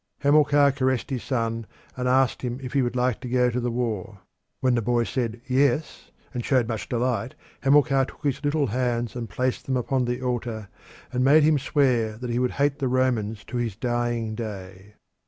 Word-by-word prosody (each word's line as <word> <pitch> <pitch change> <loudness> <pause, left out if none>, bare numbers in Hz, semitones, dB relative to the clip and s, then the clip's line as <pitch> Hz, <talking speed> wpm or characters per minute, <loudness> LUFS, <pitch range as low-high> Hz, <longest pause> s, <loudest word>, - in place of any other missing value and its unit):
Hamilcar 145 0 +5
caressed 130 -1 -1
his 130 -3 -2
son 115 -4 -2 0.3
and 125 0 -2
asked 130 0 +2
him 125 0 -3
if 125 - -6
he 140 - +3
would 120 0 -1
like 125 -2 +1
to 125 - -6
go 125 0 +3
to 125 - -1
the 120 0 -1
war; 110 -4 -3 0.4
when 130 -1 +2
the 120 - +1
boy 120 +2 +1
said 115 -1 -2
yes, 135 +3 0 0.2
and 120 -2 -3
showed 125 -3 +2
much 115 -2 -4
delight, 120 -1 -1 0.3
Hamilcar 135 -1 +4
took - - -15
his 140 0 -1
little 145 0 +1
hands 120 -1 -1
and 120 -2 -5
placed 130 0 -2
them 130 -1 +1
upon 125 +1 0
the 125 0 -2
altar, 120 -4 -3 0.4
and 125 0 +1
made 145 +4 +6
him 150 -1 +4
swear 125 -6 +1
that 120 +1 -5
he 120 - 0
would 125 0 0
hate 140 +1 +1
the 135 - 0
Romans 120 -4 0
to 125 - -5
his 115 -5 -2
dying 120 -1 -1
day. 100 -2 -7
125 Hz, 195 wpm, -25 LUFS, 115-135 Hz, 0.4 s, made